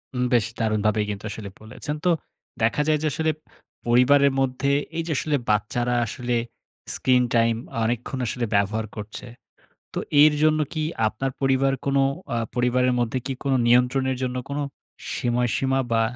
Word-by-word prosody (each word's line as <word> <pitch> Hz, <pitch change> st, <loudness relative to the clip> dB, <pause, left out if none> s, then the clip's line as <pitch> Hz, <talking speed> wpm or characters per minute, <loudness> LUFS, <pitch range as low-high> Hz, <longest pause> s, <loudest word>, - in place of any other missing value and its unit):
উম 125 Hz, -, 0 dB
বেশ 115 Hz, -2 st, +4 dB
দারুণভাবেই 110 Hz, -1 st, +1 dB
কিন্তু 100 Hz, 0 st, -5 dB
আসলে 105 Hz, -1 st, -7 dB
বলেছেন। 130 Hz, +7 st, -5 dB
তো -, -, +4 dB, 0.5 s
দেখা 115 Hz, +6 st, +2 dB
যায় 155 Hz, -1 st, +3 dB
যে -, -, +2 dB
আসলে 160 Hz, 0 st, +1 dB, 0.6 s
পরিবারের 140 Hz, +4 st, +5 dB
মধ্যে 135 Hz, +1 st, 0 dB, 0.3 s
এই 165 Hz, -, 0 dB
যে -, -, -2 dB
আসলে 150 Hz, +2 st, 0 dB
বাচ্চারা 120 Hz, +4 st, +1 dB
আসলে 120 Hz, +2 st, -2 dB, 0.6 s
স্ক্রিন-টাইম 120 Hz, -3 st, +2 dB, 0.3 s
অনেকক্ষণ 120 Hz, +3 st, -2 dB
আসলে 120 Hz, +1 st, -2 dB
ব্যবহার 105 Hz, +2 st, +1 dB
করছে। 105 Hz, +3 st, -7 dB, 0.7 s
তো -, -, -1 dB, 0.2 s
এর 150 Hz, 0 st, +7 dB
জন্য 155 Hz, 0 st, +4 dB
কি 155 Hz, -1 st, -2 dB, 0.3 s
আপনার 135 Hz, +5 st, -3 dB
পরিবার 135 Hz, 0 st, +2 dB
কোন 140 Hz, 0 st, +1 dB, 0.4 s
আ -, -, 0 dB, 0.2 s
পরিবারের 125 Hz, +1 st, +2 dB
মধ্যে 120 Hz, +2 st, 0 dB
কি 135 Hz, -, -1 dB
কোনো 135 Hz, -1 st, +2 dB
নিয়ন্ত্রণের 125 Hz, +2 st, +3 dB
জন্য 125 Hz, 0 st, -2 dB
কোনো 145 Hz, +1 st, -2 dB, 0.5 s
সময়সীমা 125 Hz, +2 st, +1 dB
বা 115 Hz, 0 st, +3 dB
125 Hz, 150 wpm, -24 LUFS, 115-135 Hz, 0.7 s, এর